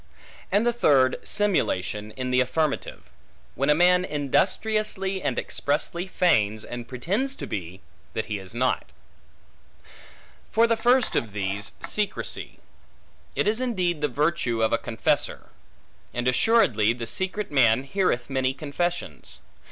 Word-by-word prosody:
And 205 +4 +3
the 240 - +2
third, 135 - +3
simulation, 105 - 0
in 130 -1 -4
the 125 - +3
affirmative; 140 +3 -1 0.5
when 140 +3 -1
a 150 - +6
man 180 +2 +4
industriously 190 +6 0
and - - -1
expressly 170 +5 -1
feigns 110 - +2
and 120 -1 -7
pretends 200 - -2
to - - -6
be, 95 0 -6 0.3
that 110 - -2
he 105 -2 -4
is 95 +3 -9
not. 125 +1 0 1.6
For 230 +2 +4
the 230 0 +2
first 245 +2 +2
of 110 -4 -1
these, 100 0 0
secrecy; 210 -2 -2 0.8
it - - +1
is 220 +4 +2
indeed 180 -10 -1
the 150 - +2
virtue 145 -4 0
of 110 - +2
a 115 - +2
confessor. 115 -2 -1 0.7
And 120 +1 -1
assuredly, 125 - +3
the 120 -1 -6
secret 190 - -2
man 125 -3 +4
heareth 135 -6 0
many 130 -1 0
confessions. 155 - -4
145 Hz, 135 wpm, -25 LUFS, 115-190 Hz, 1.6 s, a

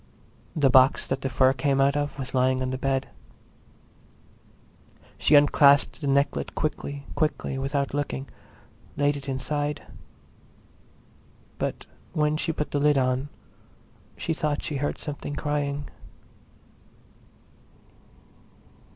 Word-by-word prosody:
The 140 -5 +3
box 130 +2 +5
that 135 0 -2
the 135 - -2
fur 130 +1 +4
came 135 +1 0
out 140 +1 +3
of 145 0 -2
was 135 -2 -5
on 130 0 +1
the 130 - -2
bed. 135 0 -1 2.1
She 150 - +4
unclasped 145 +1 +5
the 145 - -2
necklet 140 +1 0
quickly; 145 -2 -3
quickly, 150 -3 -1
without 140 0 -1
looking, 140 -1 -3 0.7
laid 145 0 +2
it 140 -1 -6
inside. 145 +2 -2 1.8
But - - -3 0.3
when 150 0 +1
she 160 - -1
put 150 -1 -4
the 145 - 0
lid 145 0 +3
on 130 +1 0 0.9
she 165 - -2
thought 150 -2 -2
she 150 - -3
heard 145 +2 -2
something 145 -1 -6
crying. 145 -1 -2
140 Hz, 115 wpm, -26 LUFS, 135-145 Hz, 2.1 s, box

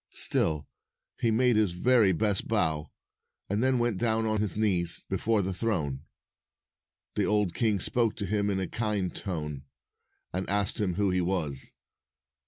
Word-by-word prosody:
Still, 75 -3 +2 0.5
he 115 - +2
made 120 +1 +3
his 105 -5 +2
very 110 +2 +4
best 100 +2 +1
bow, 80 -8 0 0.6
and 100 +2 -1
then 130 0 +3
went 120 -5 0
down 115 -1 +1
on 110 -1 0
his 105 -3 -1
knees 90 -6 0
before 105 +2 +1
the 95 +1 -2
throne. 80 -11 -2 1.1
The - - +1
old 105 -4 +1
king 110 -2 +1
spoke 115 +3 +1
to 100 - -3
him 100 +1 0
in 95 -1 0
a 95 - -1
kind 105 -5 -2
tone, 75 -8 -4 0.7
and 95 +1 -3
asked 100 -1 +1
him 90 -4 0
who 100 0 +1
he 90 0 +1
was. 85 -7 -1
100 Hz, 160 wpm, -28 LUFS, 90-110 Hz, 1.1 s, very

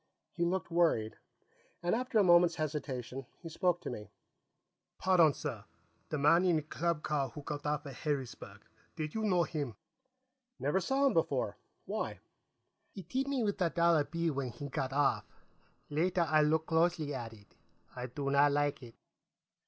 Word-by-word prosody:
He 170 - -2
looked 185 0 -1
worried, 165 -11 +2 0.7
and 175 - +1
after 250 0 0
a 210 - +6
moment's 175 -2 +6
hesitation, 135 -4 -4
he 165 - -9
spoke 175 +1 +1
to - - -5
me. 105 -3 -7 0.9
"Pardon, 175 -4 +5
sir. 125 -9 -5 0.4
The 155 - -1
man 160 +5 +5
in 180 -3 +3
the 155 - +1
club 160 +1 -2
car 140 -3 0
who 150 - -9
got 150 +1 -4
off 150 0 -1
at 140 -3 -8
Harrisburg; 140 -5 -4 0.3
did 155 -1 -4
you 220 - -2
know 180 -5 +3
him?" 145 -9 -4 0.8
"Never 145 +7 +1
saw 270 +7 +1
him 275 - +4
before. - - 0 0.3
Why?" - - -3 0.7
"He 195 - -9
tipped 265 - -2
me 270 -4 0
with 205 -2 -1
a 175 - +3
dollar 170 -2 +3
bill 165 +1 -1
when 135 -2 -2
he 140 +4 -7
got 130 0 -2
off. 140 0 +1 0.6
Later, 175 +3 +2
I 155 -1 +4
looked 155 +1 +2
closely 160 -2 +1
at 115 -1 -5
it. 105 -2 -18 0.4
I 125 0 -4
do 140 +2 -3
not 140 +1 +5
like 145 0 0
it." 115 -2 -12
155 Hz, 170 wpm, -33 LUFS, 140-175 Hz, 0.9 s, a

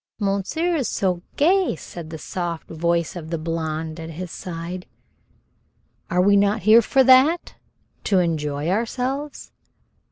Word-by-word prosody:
"Monsieur 205 - -1
is 270 - -1
so 180 -3 -1
gay!" 365 - +3
said 165 0 -9
the 160 - -6
soft 170 +1 -5
voice 170 +1 -1
of 160 -3 -7
the 165 - -2
blonde 160 0 -3
at 165 0 -7
his 170 +2 -7
side. 180 0 -6 1.2
"Are 180 +1 +2
we 200 +1 +5
not 200 0 +2
here 220 +3 +7
for 265 +4 +3
that, 265 +7 +5 0.5
to 195 - +2
enjoy 150 -4 -1
ourselves?" 255 +8 -2
180 Hz, 135 wpm, -22 LUFS, 165-235 Hz, 1.2 s, here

